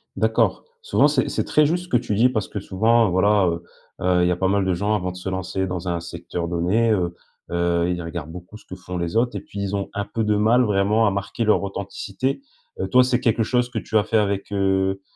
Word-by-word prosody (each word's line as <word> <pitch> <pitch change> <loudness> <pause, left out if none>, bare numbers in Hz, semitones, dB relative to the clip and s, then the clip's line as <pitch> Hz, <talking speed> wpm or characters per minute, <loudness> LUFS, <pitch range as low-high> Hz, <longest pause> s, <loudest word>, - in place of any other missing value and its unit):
D'accord. - - +1 0.2
Souvent, 470 - +3
c'est - - +1
c'est - - -1
très 150 -1 +3
juste 175 +4 0
ce - - -19
que 120 - +4
tu 120 -3 -3
dis, 120 +4 +4
parce 110 -6 -2
que 105 - -5
souvent, 110 +3 +2
voilà, 100 +2 +3
heu, 85 0 -2 0.4
heu, 90 -1 +2
il - - +3
y 90 - +2
a - - +1
pas 95 - +1
mal 100 +1 +2
de 95 -1 +1
gens 100 +4 0
avant 90 -3 -1
de 90 - -10
se 90 - -8
lancer 95 0 -2
dans 90 0 -4
un 85 -1 -1
secteur 85 0 -5
donné, 90 +7 +1
heu, 90 -5 0 0.4
heu, 85 0 +1
ils 90 -1 -3
regardent 80 -2 -6
beaucoup 90 +4 -10
ce - - -21
que 95 - -8
font 90 -1 -7
les 85 +4 -2
autres 120 0 +1
et 100 - -3
puis, 100 0 -9
ils 100 0 -2
ont 100 -1 -3
un 100 0 -2
peu 115 - -3
de 105 0 +1
mal, 110 +4 +4
vraiment, 105 +1 +2
à - - +2
marquer 100 +4 -3
leur 105 -1 +3
authenticité. 100 - -4 0.4
Heu, - - -1
toi, 125 0 +5
c'est 125 -1 +1
quelque 115 -1 +1
chose 125 +2 0
que 125 - -3
tu 110 - -1
as 105 - +3
fait 115 - +1
avec, 100 -1 -1
heu, 95 -1 +1
100 Hz, 255 wpm, -22 LUFS, 90-110 Hz, 0.4 s, toi